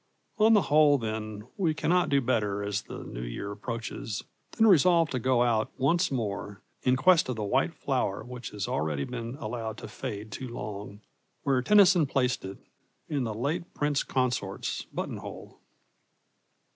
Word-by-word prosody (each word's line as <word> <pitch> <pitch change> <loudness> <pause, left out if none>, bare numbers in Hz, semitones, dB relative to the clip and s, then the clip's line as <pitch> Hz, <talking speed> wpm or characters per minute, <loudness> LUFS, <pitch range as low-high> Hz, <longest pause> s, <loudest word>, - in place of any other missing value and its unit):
On 220 +1 +6
the 205 - +4
whole, 150 -1 +5
then, 110 -3 -4
we 170 -6 +1
cannot 175 +2 +2
do 140 -1 +3
better 105 -5 0
as 100 -1 -1
the - - -8
New - - -7
Year - - -5
approaches 115 0 -5 0.3
than 225 - +3
resolve 170 -4 +5
to 130 - -1
go 125 0 +3
out 110 -3 +1
once 165 +7 +2
more 105 -5 -3 0.2
in 125 0 +3
quest 165 +1 +4
of 125 - -1
the 110 - -3
white 100 - +1
flower 95 - -1
which 125 +1 -7
has 105 -2 -4
already 75 -2 -1
been 120 - -5
allowed 110 -4 -5
to - - -8
fade 105 +1 -6
too 130 +6 -5
long, 105 -2 -7 0.4
where 135 -2 +2
Tennyson 185 -1 +6
placed 125 -2 0
it, 95 +1 -7 0.5
in 140 -5 0
the 110 - -2
late 155 +9 -3
Prince 145 -1 +1
Consort's 120 -7 -2
buttonhole. - - -7
125 Hz, 160 wpm, -28 LUFS, 105-145 Hz, 0.5 s, On